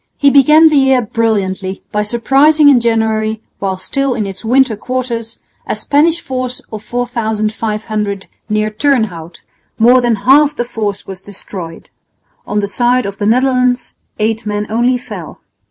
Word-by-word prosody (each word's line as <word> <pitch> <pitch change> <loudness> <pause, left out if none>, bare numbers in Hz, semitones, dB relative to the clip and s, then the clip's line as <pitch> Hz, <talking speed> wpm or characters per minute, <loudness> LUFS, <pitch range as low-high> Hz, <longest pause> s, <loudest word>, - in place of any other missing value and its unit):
He 280 -1 +4
began 300 +4 +6
the 300 - +2
year 265 -2 +3
brilliantly 200 -4 -2
by 210 - 0
surprising 275 +7 +4
in 270 -3 +5
January, 220 -1 0 0.2
while 190 -1 -2
still 275 +7 -1
in 215 -3 -2
its 195 +1 -7
winter 250 0 +2
quarters, 235 0 -4 0.3
a - - -1
Spanish 320 +4 +2
force 255 -4 -4
of 215 -1 -6
4500 215 -4 -3 0.2
near 215 0 0
Turnhout. 215 - -1 0.4
More 245 +3 +5
than 240 -2 +1
half 290 +3 +5
the 240 - -2
force 210 -4 -4
was 190 -1 -9
destroyed. 185 -4 -9 0.6
On 210 0 -1
the 200 - -2
side 245 +5 +1
of 200 0 -6
the 205 - 0
Netherlands 250 +1 +1 0.2
eight 220 +1 -1
men 210 0 -2
only 240 +3 +2
fell. 245 - -9
230 Hz, 150 wpm, -14 LUFS, 210-255 Hz, 0.6 s, began